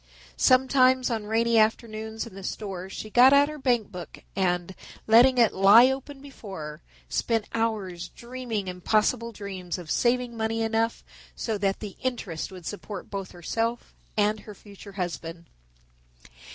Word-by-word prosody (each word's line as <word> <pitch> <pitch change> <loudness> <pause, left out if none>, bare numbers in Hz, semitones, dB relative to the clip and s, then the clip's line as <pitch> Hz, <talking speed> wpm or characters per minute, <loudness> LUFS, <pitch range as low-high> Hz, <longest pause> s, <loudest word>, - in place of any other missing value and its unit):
Sometimes 255 - +4
on 220 -2 -3
rainy 230 +1 +3
afternoons 220 0 -1
in 230 - -11
the 195 - -9
store 190 -1 -5
she 215 +2 -7
got 255 +4 +7
out 285 +1 +5
her 305 0 -7
bank 240 -6 +1
book 180 -3 -9
and, 180 -1 0 0.3
letting 245 +4 +6
it 235 -3 +4
lie 215 +7 +7
open 270 +1 -6
before 220 - -9
her, 150 +1 -7 0.3
spent 225 -3 0
hours 205 -6 -2
dreaming 235 -5 -5
impossible 215 +6 0
dreams 195 -4 -6
of 175 -4 -7
saving 245 0 +1
money 225 0 -1
enough 225 +1 0 0.3
so 225 - -2
that 195 -1 0
the 205 -3 -7
interest 225 -12 -3
would 180 -3 -11
support 205 0 -7
both 195 -2 -4
herself 225 +7 -3 0.2
and 210 +1 +2
her 210 0 -11
future 200 0 -13
husband. 170 -2 -5
220 Hz, 150 wpm, -26 LUFS, 190-235 Hz, 0.3 s, got